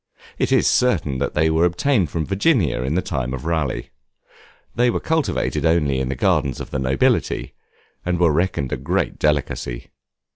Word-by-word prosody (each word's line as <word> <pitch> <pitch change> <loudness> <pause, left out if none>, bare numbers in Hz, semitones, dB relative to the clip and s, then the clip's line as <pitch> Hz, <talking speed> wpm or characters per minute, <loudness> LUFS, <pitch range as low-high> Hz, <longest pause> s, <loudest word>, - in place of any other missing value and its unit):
It - - 0
is - - +4
certain 75 - +1
they 80 +1 +3
were 80 +1 +2
obtained 90 - +1
from 80 +1 -2
Virginia 100 - +1
in 65 +5 -1
the 90 - +1
time 65 -4 -3
of 65 +3 -8
Raleigh; 80 -6 -2 0.8
they 120 +1 +2
were - - 0
cultivated 160 -2 -1
only 75 -5 +2
in 65 -1 -2
the 70 - -2
gardens 65 +1 +1
of - - -7
the 70 - -2
nobility, 65 0 0 0.5
and 90 -1 -1
were 85 -3 +4
reckoned 75 -5 -1
a - - -1
great - - -2
delicacy. 70 -5 -1
80 Hz, 170 wpm, -21 LUFS, 65-90 Hz, 0.8 s, is